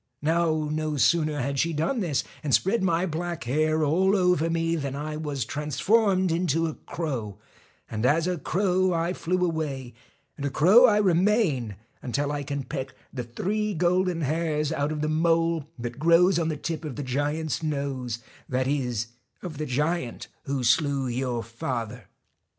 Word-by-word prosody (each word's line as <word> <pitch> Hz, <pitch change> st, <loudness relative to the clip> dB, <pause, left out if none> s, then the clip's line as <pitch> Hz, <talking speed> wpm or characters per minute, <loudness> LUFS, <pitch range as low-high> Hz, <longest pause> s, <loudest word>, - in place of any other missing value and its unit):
Now, 160 Hz, -1 st, +1 dB
no 155 Hz, -1 st, -1 dB
sooner 155 Hz, +1 st, +2 dB
had 140 Hz, +2 st, -2 dB
she 170 Hz, 0 st, +1 dB
done 160 Hz, -, 0 dB
this, 150 Hz, -, 0 dB, 0.2 s
and 145 Hz, -3 st, +3 dB
spread 195 Hz, +4 st, +1 dB
my 175 Hz, -1 st, +2 dB
black 170 Hz, 0 st, -3 dB
hair 155 Hz, +5 st, +1 dB
all 185 Hz, +7 st, +3 dB
over 180 Hz, -4 st, +2 dB
me, 165 Hz, 0 st, 0 dB
than 140 Hz, -4 st, -3 dB
I 150 Hz, +2 st, -4 dB
was 145 Hz, -6 st, -3 dB
transformed 185 Hz, -, +1 dB
into 165 Hz, -1 st, +1 dB
a 160 Hz, -, -2 dB
crow, 125 Hz, -, -5 dB, 0.5 s
and 110 Hz, 0 st, -4 dB
as 155 Hz, +6 st, +3 dB
a 180 Hz, -2 st, -1 dB
crow 185 Hz, +1 st, +1 dB
I 170 Hz, +1 st, 0 dB
flew 180 Hz, 0 st, 0 dB
away, 140 Hz, -7 st, -3 dB, 0.4 s
and 140 Hz, -, -6 dB
a 140 Hz, -, 0 dB
crow 195 Hz, -, +6 dB
I 210 Hz, -3 st, +4 dB
remain 180 Hz, -, +2 dB, 0.3 s
until 140 Hz, +3 st, -1 dB
I 145 Hz, -1 st, -2 dB
can 140 Hz, 0 st, -3 dB
peck 130 Hz, +1 st, -5 dB, 0.2 s
the 125 Hz, -3 st, -3 dB
three 205 Hz, -, -2 dB
golden 180 Hz, +1 st, +1 dB
hairs 155 Hz, 0 st, 0 dB
out 145 Hz, -1 st, -1 dB
of 150 Hz, -1 st, -3 dB
the 155 Hz, -, 0 dB
mole 165 Hz, 0 st, +1 dB
that 120 Hz, +1 st, -6 dB
grows 170 Hz, +3 st, +5 dB
on 165 Hz, -1 st, 0 dB
the 155 Hz, -, -2 dB
tip 165 Hz, +1 st, -4 dB
of 150 Hz, -5 st, -5 dB
the 145 Hz, -, -4 dB
giant's 145 Hz, +5 st, -1 dB
nose, 140 Hz, -6 st, -2 dB, 0.3 s
that 130 Hz, 0 st, 0 dB
is, 125 Hz, -5 st, -1 dB, 0.3 s
of 160 Hz, -5 st, -6 dB
the 155 Hz, -, -2 dB
giant 150 Hz, 0 st, -2 dB, 0.2 s
who 135 Hz, -2 st, -2 dB
slew 135 Hz, +2 st, +2 dB
your 120 Hz, -1 st, -2 dB
father. 115 Hz, -1 st, -5 dB
155 Hz, 170 wpm, -26 LUFS, 140-170 Hz, 0.5 s, crow